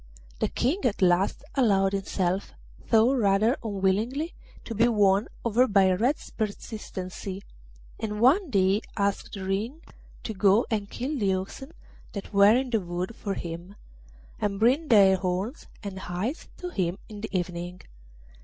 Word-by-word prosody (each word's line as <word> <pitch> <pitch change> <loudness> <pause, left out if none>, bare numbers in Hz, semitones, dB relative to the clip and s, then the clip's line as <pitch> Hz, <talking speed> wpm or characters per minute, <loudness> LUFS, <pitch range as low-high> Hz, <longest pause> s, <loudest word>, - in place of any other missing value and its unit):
The - - +1
King 285 +11 0
at 215 -5 +1
last 180 +6 +2
allowed 200 -7 +3
himself, 190 -1 -1 0.4
though 230 +3 +5
rather 215 0 +3
unwillingly, 220 - 0 0.3
to 230 - -5
be 225 +2 +4
won 205 -3 +3 0.2
over 235 +3 +4
by 195 -3 +4
Red's 240 +11 0
persistency, 200 -3 -5 0.6
and 210 -1 -3
one 300 - +4
day 195 -1 +3 0.2
asked 200 0 -1
Ring 200 +9 -2 0.4
to 220 - -4
go 200 +3 +4
and 205 -2 -1
kill 275 +3 -3
the 195 -3 +2
oxen 200 +10 -6 0.4
that 200 +1 -7
were 200 +2 +7
in 260 -1 -2
the 225 -3 +2
wood 180 +4 -4
for 200 -2 -4
him, 170 +3 -7 0.6
and 200 -1 -1
bring 260 +8 +3
their 195 -5 +6
horns 190 - -3 0.2
and 195 -2 -5
hides 190 - -4
to 360 - -5
him 185 - -1
in 210 -1 -9
the 220 - -4
evening. 175 -1 -3
200 Hz, 145 wpm, -27 LUFS, 190-235 Hz, 0.6 s, were